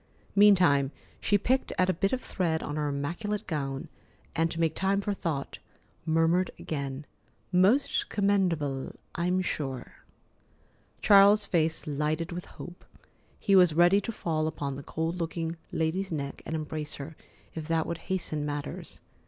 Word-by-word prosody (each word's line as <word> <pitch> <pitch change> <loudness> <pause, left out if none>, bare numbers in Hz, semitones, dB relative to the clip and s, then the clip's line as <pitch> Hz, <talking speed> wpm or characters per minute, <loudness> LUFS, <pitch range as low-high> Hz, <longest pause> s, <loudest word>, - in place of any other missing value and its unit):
Meantime, 180 -10 +6 0.3
she 205 - +3
picked 255 +6 0
at 185 - +3
a 185 - +2
bit 195 +4 0
of 255 - -1
thread 165 -4 -1
on 145 - -4
her 150 -1 -1
immaculate 170 +9 -3
gown, 135 -4 -3 0.5
and, 165 0 +2
to 165 - -5
make 165 -2 +2
time 195 +3 +1
for 200 0 -1
thought, 160 -8 -3 0.5
murmured 165 +3 +3
again: 140 -2 -4 0.5
"Most 195 +10 +3
commendable, 175 -10 0 0.2
I'm 180 +2 0
sure." 135 -7 -4 1.1
Charles's 200 +1 +7
face 165 -4 0
lighted 155 +4 -1
with 175 +1 -5
hope. 175 0 -11 0.6
He 195 - +3
was 180 -4 +6
ready 175 +4 +5
to 230 - -4
fall 160 -7 -1
upon 145 -3 -3
the 135 - -6
cold 160 +4 -3
looking 165 -1 -3 0.2
lady's 175 +4 -1
neck 140 -3 -4
and 160 - -2
embrace 155 -1 -4
her, 145 +3 -8 0.4
if 160 -2 -6
that 165 -1 +1
would 170 - -4
hasten 160 -5 -1
matters. 145 -1 -5
165 Hz, 150 wpm, -28 LUFS, 150-190 Hz, 1.1 s, Charles's